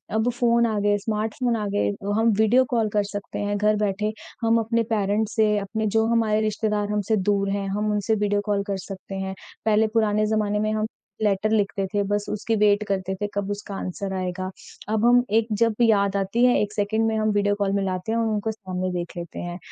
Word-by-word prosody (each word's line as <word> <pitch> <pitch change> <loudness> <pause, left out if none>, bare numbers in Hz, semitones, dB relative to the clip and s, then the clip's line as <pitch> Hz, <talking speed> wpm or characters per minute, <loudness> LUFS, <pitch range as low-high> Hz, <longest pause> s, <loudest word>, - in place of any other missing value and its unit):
अब 220 +3 +2
फ़ोन 235 -1 +2
आ 220 -2 0
गए, 205 0 +2
स्मार्टफ़ोन 220 +3 -1
आ 215 -2 -2
गए, - - +2 0.3
हम 225 0 +4
वीडियो 235 +4 +5
कॉल 220 -2 +2
कर 205 -1 +2
सकते 205 0 -5
हैं 205 0 -1
घर 210 +1 +3
बैठे, 210 +2 -1 0.3
हम 230 0 +3
अपने 230 +1 +1
पेरेंट्स 210 +1 0
से, 210 -1 +3
अपने 220 +2 -3
जो 220 - +3
हमारे 220 -2 +2
रिश्तेदार 210 -1 -1
हमसे 210 +1 +1
दूर 200 -1 +1
है 200 0 -1
हम 210 +2 -1
उनसे 210 +1 +1
वीडियो 205 0 +1
कॉल 205 -1 0
कर 195 - -1
सकते 195 0 -8
हैं। 190 0 -3 0.3
पहले 220 0 +3
पुराने 215 -1 +2
जमाने 210 -1 0
में 215 0 0
हम 215 0 0 0.4
लेटर 205 0 +1
लिखते 200 -2 +1
थे 205 - +2
बस 205 0 0
उसकी 220 +2 -1
वेट 210 0 +3
करते 190 -1 -1
थे 205 - 0
कब 200 0 -2
उसका 205 -1 -5
आंसर 190 +1 -4
आएगा। 185 0 -3 0.4
अब 220 +1 +1
हम 245 +1 +6 0.2
एक 225 - -3
जब 230 -1 +4
याद 200 -3 +3
आती 200 +5 0
है 250 - +5
1 210 0 -2
सेकंड 220 +2 0
में 220 - 0
हम 215 0 +1
वीडियो 205 0 +2
कॉल 195 -1 +1
मिलाते 190 +1 -2
हैं 230 - +1
और 230 - +1
उनको 215 0 -1
सामने 185 -3 -4
देख 175 -1 -4
लेते 170 -1 -6
हैं। 175 0 -5
210 Hz, 215 wpm, -24 LUFS, 200-220 Hz, 0.4 s, हम